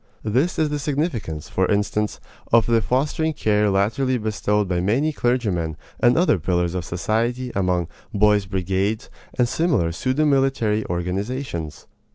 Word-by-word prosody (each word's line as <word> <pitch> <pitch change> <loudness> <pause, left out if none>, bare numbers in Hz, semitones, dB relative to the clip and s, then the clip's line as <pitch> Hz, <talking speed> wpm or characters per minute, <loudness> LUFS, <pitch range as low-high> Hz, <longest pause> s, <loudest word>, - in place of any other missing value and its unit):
This 130 +11 +1
is 155 -1 +2
the 145 0 -2
significance, 135 - -2
for - - 0
instance, 105 +1 0 0.3
of 115 -2 +5
the 115 -1 +3
fostering 150 - 0
care 105 -5 +2
latterly 115 +7 +1
bestowed 105 -2 0
by 90 -1 0
many 130 +12 +1
clergymen 100 - 0 0.2
and 120 +3 +4
other 165 - +3
pillars 90 +1 0
of 90 -2 -2
society 115 +9 -1
upon 90 -3 0 0.2
"boys' 105 -1 +3
brigades" 95 +3 -1 0.3
and 125 - +3
similar 130 - +1
pseudo 130 - 0
military 135 -7 +2
organizations. 90 - -3
110 Hz, 140 wpm, -22 LUFS, 95-130 Hz, 0.3 s, of